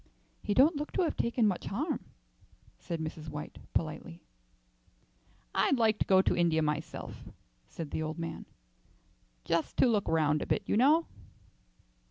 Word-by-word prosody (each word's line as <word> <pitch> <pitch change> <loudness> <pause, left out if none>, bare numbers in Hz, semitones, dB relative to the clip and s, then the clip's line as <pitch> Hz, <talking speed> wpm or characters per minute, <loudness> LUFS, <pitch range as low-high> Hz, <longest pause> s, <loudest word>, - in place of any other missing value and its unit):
"He 205 - -1
don't 290 +4 +5
look 295 +1 -4
to 370 - +2
have 325 - -1
taken 235 0 +1
much 195 -4 0
harm," 290 - -2 0.7
said 170 -2 -4
Mrs. 155 0 -5
White, 150 0 -7 0.2
politely. 165 +2 -3 1.3
"I'd 275 - +3
like 220 -2 +3
to - - 0
go 190 -1 +5
to - - +2
India 165 -2 +2
myself," 155 +1 -4 0.4
said 155 -4 -7
the - - -2
old 155 +1 -3
man, 165 0 -5 1.0
"just 170 -1 -1
to - - +5
look 220 -5 +2
round 155 -2 +2
a - - -4
bit, - - 0
you - - 0
know." 300 +8 +5
175 Hz, 155 wpm, -31 LUFS, 160-235 Hz, 1.3 s, don't